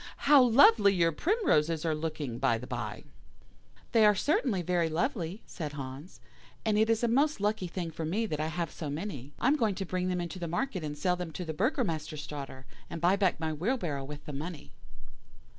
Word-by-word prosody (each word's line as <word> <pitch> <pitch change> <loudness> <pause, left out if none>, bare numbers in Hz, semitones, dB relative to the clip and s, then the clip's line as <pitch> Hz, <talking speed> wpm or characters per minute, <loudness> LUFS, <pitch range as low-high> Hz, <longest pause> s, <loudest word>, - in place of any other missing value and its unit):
How 285 -1 +8
lovely 230 -5 +6
your 170 -2 +3
primroses 165 - +1
are 160 - +2
looking, 150 -6 -4
by 130 -4 +2
the 120 - -8
bye!" - - -5 0.9
"'They 225 - +5
are 210 -1 +6
certainly 220 - +1
very 175 -1 +1
lovely,' 175 - -2
said 150 -4 -6
Hans, 140 +4 -8 0.5
'and 215 -1 +2
it 220 +1 +3
is 225 +1 +2
a - - +4
most 280 +5 +2
lucky 205 -2 0
thing 170 -1 -4
for 160 +1 -5
me 195 +9 0
that 155 -8 -3
I 155 - 0
have 170 0 -3
so 155 - -6
many. 145 - -5
I - - -3
am 290 +3 +4
going 220 -7 +1
to 195 - -3
bring 185 0 -2
them 180 -1 -1
into 175 +1 -5
the 170 - -3
market 185 +1 -2
and 150 -1 -4
sell 180 +4 +1
them 180 -1 -5
to 180 - -5
the 160 - -4
Burgomaster's 155 -1 -1
daughter, 135 -3 -8 0.2
and 165 - -5
buy 175 +4 +4
back 195 -5 +1
my 160 -1 -2
wheelbarrow 170 - -2
with 145 +1 -9
the 150 - -6
money. 155 +2 -6
170 Hz, 210 wpm, -30 LUFS, 150-210 Hz, 0.9 s, How